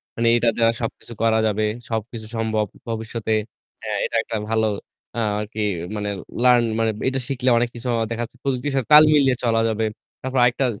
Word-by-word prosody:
মানে 115 Hz, 0 st, +1 dB
এটা 120 Hz, 0 st, +3 dB
দ্বারা 115 Hz, 0 st, +4 dB
সবকিছু 115 Hz, 0 st, -5 dB
করা 110 Hz, -1 st, +3 dB
যাবে। 110 Hz, 0 st, 0 dB, 0.2 s
সবকিছু 110 Hz, 0 st, -4 dB
সম্ভব 110 Hz, -1 st, 0 dB, 0.2 s
ভবিষ্যতে। 110 Hz, 0 st, -3 dB, 0.5 s
হ্যাঁ, 105 Hz, -1 st, -2 dB
এটা -, -, -4 dB
একটা 115 Hz, -, -5 dB
ভালো 110 Hz, -1 st, +2 dB, 0.7 s
আরকি 105 Hz, +1 st, -5 dB, 0.3 s
মানে 105 Hz, -1 st, -2 dB, 0.3 s
লার্ন 125 Hz, -1 st, +6 dB, 0.2 s
মানে 115 Hz, -1 st, +2 dB, 0.2 s
এটা 135 Hz, 0 st, -2 dB
শিখলে 130 Hz, -1 st, 0 dB
অনেক 120 Hz, 0 st, +1 dB
কিছু 120 Hz, +2 st, -6 dB, 0.2 s
দেখা 115 Hz, 0 st, -3 dB
যাচ্ছে 120 Hz, +2 st, -9 dB
প্রযুক্তির 135 Hz, +1 st, -1 dB
সাথে 135 Hz, -4 st, 0 dB
তাল 150 Hz, +1 st, +11 dB
মিলিয়ে 135 Hz, -4 st, +4 dB
চলা 115 Hz, -1 st, +2 dB
যাবে। 110 Hz, 0 st, 0 dB, 0.4 s
তারপর 130 Hz, 0 st, -3 dB
আরেকটা 125 Hz, +2 st, +2 dB
115 Hz, 170 wpm, -22 LUFS, 110-125 Hz, 0.7 s, তাল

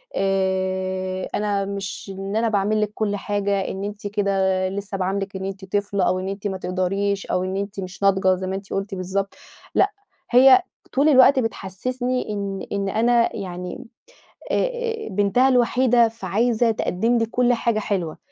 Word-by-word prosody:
آآ، 190 Hz, -1 st, -1 dB
أنا 205 Hz, -1 st, 0 dB
مش 195 Hz, 0 st, -5 dB
إن 195 Hz, +1 st, -4 dB
أنا 225 Hz, +1 st, +2 dB
باعمل 210 Hz, +1 st, +1 dB
لِك 210 Hz, -1 st, 0 dB
كُلّ 210 Hz, -1 st, -1 dB
حاجة 200 Hz, -1 st, -1 dB
إن 195 Hz, -, -4 dB
أنتِ 205 Hz, 0 st, -5 dB
كده 195 Hz, -2 st, +1 dB
لسه 195 Hz, +1 st, -4 dB
باعاملِك 195 Hz, +1 st, -2 dB
إن 190 Hz, 0 st, -4 dB
أنتِ 195 Hz, 0 st, -6 dB
طفلة 200 Hz, 0 st, -1 dB
أو 185 Hz, +1 st, +1 dB
إن 185 Hz, -, -4 dB
أنتِ 195 Hz, +1 st, -4 dB
ما 190 Hz, -1 st, -3 dB
تقدريش، 195 Hz, +2 st, -1 dB
أو 180 Hz, -, 0 dB
إن 185 Hz, +1 st, -2 dB
أنتِ 200 Hz, 0 st, -4 dB
مش 185 Hz, +1 st, -7 dB
ناضجة 190 Hz, -1 st, +4 dB
زي 185 Hz, 0 st, -5 dB
ما 190 Hz, -, -2 dB
أنتِ 195 Hz, 0 st, -7 dB
قلتِ 195 Hz, 0 st, -3 dB
بالضبط، 190 Hz, +2 st, -2 dB, 0.4 s
لأ 400 Hz, -, +4 dB, 0.4 s
هي 265 Hz, +8 st, +8 dB, 0.3 s
طول 285 Hz, +3 st, +4 dB
الوقت 265 Hz, -1 st, +6 dB
بتحسِّسني 245 Hz, +4 st, -3 dB
إن 200 Hz, -1 st, -3 dB
إن 200 Hz, -1 st, -1 dB
أنا 235 Hz, +3 st, +2 dB
يعني 180 Hz, +1 st, -6 dB, 0.7 s
أ -, -, +2 dB, 0.5 s
أ -, -, -6 dB
بنتها 205 Hz, +6 st, +3 dB
الوحيدة 245 Hz, -1 st, +4 dB
فعايزة 225 Hz, +2 st, +1 dB
تقدِّم 225 Hz, +2 st, 0 dB
لي 225 Hz, -, +2 dB
كُلّ 245 Hz, +2 st, +2 dB
حاجة 230 Hz, -2 st, 0 dB
حلوة، 185 Hz, -7 st, -2 dB
200 Hz, 165 wpm, -22 LUFS, 190-220 Hz, 0.7 s, هي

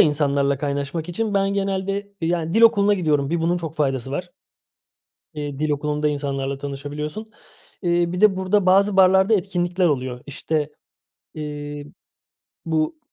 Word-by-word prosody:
insanlarla 140 Hz, -2 st, +2 dB
kaynaşmak 145 Hz, +3 st, -3 dB
için 210 Hz, +4 st, -2 dB
ben 195 Hz, 0 st, +2 dB
genelde, 195 Hz, +1 st, -2 dB
yani, 165 Hz, 0 st, -1 dB
dil 225 Hz, -, +4 dB
okuluna 205 Hz, -2 st, +5 dB
gidiyorum. 150 Hz, -6 st, 0 dB
Bir 170 Hz, 0 st, 0 dB
bunun 170 Hz, +2 st, +1 dB
çok 165 Hz, -3 st, -5 dB
faydası 135 Hz, -4 st, -1 dB
var. 175 Hz, +5 st, -4 dB, 1.0 s
Eee, 145 Hz, -2 st, -5 dB
dil 155 Hz, 0 st, 0 dB
okulunda 150 Hz, +1 st, 0 dB
insanlarla 140 Hz, -1 st, -2 dB
tanışabiliyorsun. 145 Hz, +9 st, -6 dB, 0.5 s
Iıı, 175 Hz, 0 st, +1 dB
bir 180 Hz, -, -3 dB
de 210 Hz, -3 st, +5 dB
burada 190 Hz, +1 st, +1 dB
bazı 195 Hz, +2 st, +4 dB
barlarda 190 Hz, +3 st, +5 dB
etkinlikler 180 Hz, -2 st, 0 dB
oluyor. 130 Hz, -4 st, -2 dB
İşte, 150 Hz, +1 st, -2 dB, 0.6 s
eee, 145 Hz, -1 st, -6 dB, 0.8 s
bu 160 Hz, -, -1 dB
160 Hz, 135 wpm, -22 LUFS, 145-190 Hz, 1.0 s, okuluna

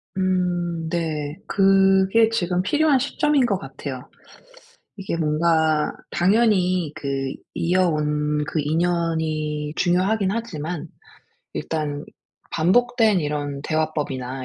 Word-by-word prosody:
음 185 Hz, -1 st, +1 dB, 0.4 s
네 155 Hz, -3 st, -2 dB
그게 195 Hz, +2 st, +4 dB
지금 180 Hz, -5 st, 0 dB
필요한 295 Hz, +8 st, +3 dB
시점인 285 Hz, +1 st, +1 dB
것 200 Hz, -5 st, +1 dB
같아요. 135 Hz, -1 st, -8 dB, 0.9 s
이게 195 Hz, -4 st, -4 dB
뭔가 160 Hz, -1 st, +2 dB, 0.2 s
당연히 185 Hz, -4 st, +2 dB
그 135 Hz, -1 st, -3 dB, 0.2 s
이어 180 Hz, +1 st, +2 dB
온 150 Hz, -1 st, 0 dB
그 160 Hz, -, -2 dB
인연이 155 Hz, -2 st, -1 dB
중요하긴 190 Hz, +3 st, +1 dB
하지만 175 Hz, -8 st, -4 dB, 0.7 s
일단 150 Hz, -2 st, -3 dB, 0.5 s
반복된 220 Hz, +3 st, +3 dB
이런 145 Hz, -2 st, -3 dB
대화법이나 145 Hz, -5 st, -2 dB
170 Hz, 210 characters per minute, -22 LUFS, 150-195 Hz, 0.9 s, 그게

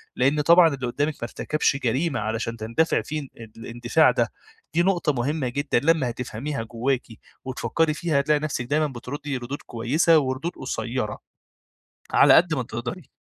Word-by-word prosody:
لأن 140 Hz, +4 st, +2 dB
طبعًا 170 Hz, +3 st, +7 dB
اللي 130 Hz, -2 st, -4 dB
قُدّامِك 145 Hz, +5 st, -1 dB
ما 120 Hz, -, -11 dB
ارتكبش 145 Hz, +4 st, 0 dB
جريمة 135 Hz, +6 st, 0 dB
علشان 115 Hz, +2 st, -3 dB
تندفعي 115 Hz, +9 st, 0 dB
فيه 150 Hz, -2 st, -5 dB, 0.3 s
الاندفاع 120 Hz, +1 st, +2 dB
ده، -, -, 0 dB, 0.4 s
دي 170 Hz, -, +3 dB
نقطة 175 Hz, -5 st, +1 dB
مهمة 135 Hz, +2 st, -1 dB
جدًا 140 Hz, 0 st, 0 dB
لمّا 155 Hz, -5 st, +3 dB
هتفهميها 125 Hz, +2 st, -4 dB
جواكِ 120 Hz, +3 st, -2 dB, 0.4 s
وتفكّري 155 Hz, +4 st, 0 dB
فيها 155 Hz, -2 st, 0 dB
هتلاقي 150 Hz, +2 st, +2 dB
نفسِك 145 Hz, -5 st, -3 dB
دايمًا 150 Hz, +4 st, +1 dB
بترُدّي 135 Hz, +2 st, -5 dB
ردود 125 Hz, +4 st, -6 dB
كويسة 140 Hz, +8 st, +2 dB
وردود 135 Hz, +4 st, -2 dB
قصيّرة 120 Hz, -3 st, -3 dB, 0.9 s
على -, -, +6 dB
قد 165 Hz, -1 st, +5 dB
ما 130 Hz, -, -1 dB
تقدري. 120 Hz, -, -6 dB
135 Hz, 150 wpm, -24 LUFS, 120-155 Hz, 0.9 s, طبعًا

